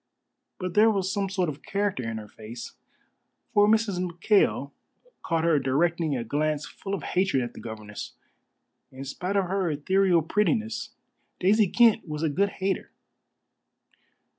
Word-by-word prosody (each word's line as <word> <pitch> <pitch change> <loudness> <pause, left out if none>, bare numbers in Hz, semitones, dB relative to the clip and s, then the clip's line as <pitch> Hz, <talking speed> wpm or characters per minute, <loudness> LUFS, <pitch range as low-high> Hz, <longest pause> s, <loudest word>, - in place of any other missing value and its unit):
But 180 -2 -4
there 215 +2 +6
was 195 -3 0
some 200 -1 -1
sort 185 -2 0
of 150 -2 -5
character 200 -7 -1
in 115 - -4
her 105 -1 -8
face, 110 +3 -9 0.8
for 205 0 +5
Mrs. 215 -4 +2
McKail 175 -4 +1 0.5
caught 165 -2 0
her 165 -3 +4
directing 155 +2 +1
a 120 - -3
glance 150 +5 -1
full 200 0 -5
of - - -7
hatred 180 -8 +1
at 120 - -6
the - - -10
governess. 110 -2 -7 0.8
In 130 +1 -8
spite 180 +8 -3
of 195 -1 +3
her 190 -1 0
ethereal 175 +3 +2
prettiness, 220 - 0 0.5
Daisy 205 +3 +4
Kent 225 0 +4
was 150 0 -4
a 160 - +2
good 200 +7 +1
hater. 195 0 -2
180 Hz, 150 wpm, -26 LUFS, 145-200 Hz, 0.8 s, there